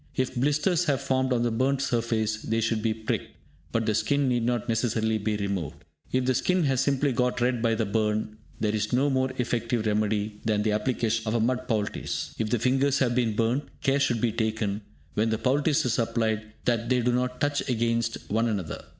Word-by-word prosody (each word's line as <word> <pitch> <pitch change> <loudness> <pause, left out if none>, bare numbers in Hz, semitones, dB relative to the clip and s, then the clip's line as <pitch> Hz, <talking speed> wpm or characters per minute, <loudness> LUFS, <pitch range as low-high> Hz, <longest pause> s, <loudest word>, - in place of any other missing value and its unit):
If 130 -1 0
blisters 150 +7 +1
have 140 -4 +1
formed 130 0 0
on 120 -1 +2
the 120 - +1
burnt 130 +4 +1
surface, 115 -4 0
they 115 +1 -1
should 115 -1 0
be 110 0 +1
pricked, 110 0 -3 0.4
but 115 -1 0
the 110 - +1
skin 140 +6 +1
need 120 -2 +1
not 120 -1 0
necessarily 110 -1 +1
be 105 0 -1
removed. 100 -7 -3 0.3
If 130 0 +1
the 130 - +3
skin 180 +8 +1
has 135 -3 +2
simply 140 0 +1
got 125 0 0
red 120 -1 +1
by 115 -1 +2
the 110 0 0
burn, 105 +1 -1 0.2
there 105 -1 0
is 110 0 -1
no 140 +3 +3
more 130 0 +1
effective 120 -2 -1
remedy 105 0 0
than 105 -1 +1
the 110 - +1
application 110 0 0
of 110 - 0
a - - +2
mud 125 +3 0
poultice. 110 -4 -2
If 110 -1 0
the 120 - +2
fingers 135 +4 +2
have 130 -3 +2
been 120 -3 +1
burnt, 120 +6 +1 0.2
care 140 -1 +3
should 120 -5 +1
be 120 - +2
taken, 110 -2 -1 0.3
when 110 +2 +1
the 110 - 0
poultice 140 +4 +2
is 120 -1 +1
applied, 110 -2 -1
that 115 -1 0
they 125 -1 +3
do 125 +1 +2
not 125 +1 -1
touch 145 -1 0
against 115 -1 0
one 115 +2 +2
another. 100 -8 -3
115 Hz, 210 wpm, -27 LUFS, 110-130 Hz, 0.4 s, the